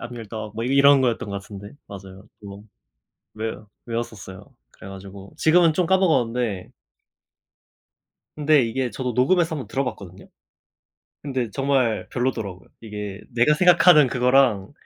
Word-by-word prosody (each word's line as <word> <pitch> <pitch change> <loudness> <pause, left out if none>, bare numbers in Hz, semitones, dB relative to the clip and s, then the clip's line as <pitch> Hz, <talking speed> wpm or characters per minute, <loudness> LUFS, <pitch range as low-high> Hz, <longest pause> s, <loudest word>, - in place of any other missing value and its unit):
I'm 120 - -8
your 115 -2 -8
dog. 110 -1 -7
뭐 115 +2 -4
이런 140 +2 +5
거였던 120 -4 -1
것 100 0 -4
같은데 100 +4 -11
맞아요. 95 +1 -12
뭐 100 0 -10 0.8
외 110 +1 -3 0.3
외웠었어요. 115 0 -7 0.2
그래 95 - -14
가지고 95 0 -11
지금은 165 0 +4
좀 180 +1 0
까먹었는데 125 - 0 1.7
근데 150 -1 +3
이게 125 +2 -2
저도 125 -2 -4
녹음해서 165 +7 +1
1 - - -5
번 - - -11
들어봤거든요? 100 -9 -5 1.0
근데 130 -5 -3
정말 135 -2 -1
별로더라고요. 110 -9 -4
이게 105 -2 -7
내가 125 +5 +3
생각하는 175 -3 +5
그거랑 125 -5 +2
120 Hz, 325 characters per minute, -22 LUFS, 100-140 Hz, 1.7 s, 이런